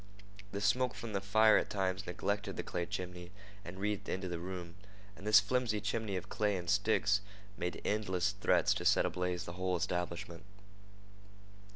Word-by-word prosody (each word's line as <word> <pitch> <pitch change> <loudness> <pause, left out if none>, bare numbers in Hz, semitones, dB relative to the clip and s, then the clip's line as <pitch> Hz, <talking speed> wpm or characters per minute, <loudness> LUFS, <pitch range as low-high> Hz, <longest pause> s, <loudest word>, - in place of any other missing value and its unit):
The 100 - -3
smoke 125 +4 +2
from 115 -2 -6
the 100 - 0
fire 110 +2 +5
at - - 0
times 95 0 -1
neglected 100 +3 -2
the - - -2
clay 85 -1 -3
chimney 90 -1 -5 0.3
and 90 +2 -8
wreathed 105 0 -2
into 95 0 -2
the 85 -1 -3
room, 90 -1 -6 0.4
and 100 - -9
this 105 0 +9
flimsy 110 0 0
chimney 105 0 -2
of 90 - -4
clay 105 -2 0
and 90 -1 -6
sticks 105 +1 +3 0.3
made 90 -2 -3
endless 95 -3 +1
threats 105 - +3
to - - -4
set - - +4
ablaze 90 -1 -2
the 85 - -6
whole 90 0 -1
establishment. 85 0 -3
95 Hz, 170 wpm, -34 LUFS, 90-105 Hz, 0.4 s, this